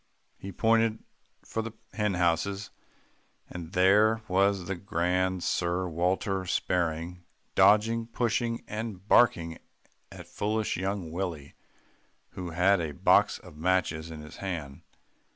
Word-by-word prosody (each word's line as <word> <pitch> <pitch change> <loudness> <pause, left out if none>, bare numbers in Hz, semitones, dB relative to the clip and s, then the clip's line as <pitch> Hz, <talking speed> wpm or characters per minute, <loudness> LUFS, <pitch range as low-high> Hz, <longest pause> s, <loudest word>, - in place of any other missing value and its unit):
He 100 - -7
pointed 115 +2 +2 0.4
for 110 - -3
the 110 0 -6 0.2
hen 105 -3 0
houses, 90 +4 0 0.8
and 85 -2 -8
there 105 +4 +4
was 95 0 +2
the 95 - -2
grand 90 0 -1
Sir 90 +1 0
Walter 95 +3 0
sparring, 85 0 -1 0.3
dodging, 110 +4 +4
pushing 115 0 -1
and 105 -3 -6
barking 85 -11 +3 0.5
at - - -10
foolish 110 +1 -1
young 95 -2 -3
Willie 85 -5 -4 0.8
who 90 -2 -6
had 90 +3 +3
a 80 -3 -3
box - - +4
of - - -14
matches 85 -2 0
in 80 -2 -8
his 75 0 -11
hand. 80 -8 -5
95 Hz, 120 wpm, -28 LUFS, 85-105 Hz, 0.8 s, there